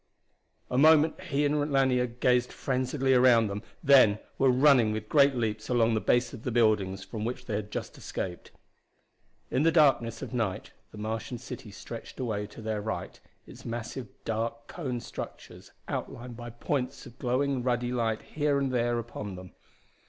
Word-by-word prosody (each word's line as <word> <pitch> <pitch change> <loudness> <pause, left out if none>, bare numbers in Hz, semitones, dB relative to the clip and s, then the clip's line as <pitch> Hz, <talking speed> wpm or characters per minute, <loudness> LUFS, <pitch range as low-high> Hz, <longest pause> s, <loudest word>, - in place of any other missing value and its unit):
A 125 - +2
moment 155 +3 +5
he 145 -3 +1
and 145 0 0
Lanier 130 -2 +3
gazed 125 +1 +1
frenziedly 130 +1 0
around 125 -3 +6
them, 100 0 -4 0.2
then 130 -8 +6 0.2
were 135 - +5
running 130 -3 +5
with 110 0 -4
great 140 0 +5
leaps 110 -2 -2
along 115 -2 +3
the 110 - +1
base 120 +2 +2
of 125 - -8
the 125 - -3
building 110 -5 +2
from 105 +2 -6
which 120 +3 -4
they 110 - -4
had 105 0 -3
just - - -5
escaped. 90 -2 -5 1.0
In 130 - +2
the 165 +2 +4
darkness 135 -8 +3
of - - -7
night 110 -7 -2 0.2
the - - -12
Martian 110 +3 -4
city 120 -2 -8
stretched 115 +5 -9
away 105 -5 -2
to 105 +2 -12
their 110 -1 -2
right, 110 +1 -5 0.3
its - - -13
massive 120 +2 -5 0.2
dark 115 +1 -2
cone 130 -8 -4
structures - - -9 0.2
outlined 120 0 -5
by 120 0 -7
points 130 +3 -3
of 120 +1 -14
glowing 130 +1 0
ruddy 120 0 0
light 115 -3 -1
here 145 -2 0
and 135 -1 0
there 120 -1 +1
upon 105 -4 -5
them. 90 0 -10
120 Hz, 170 wpm, -29 LUFS, 110-130 Hz, 1.0 s, around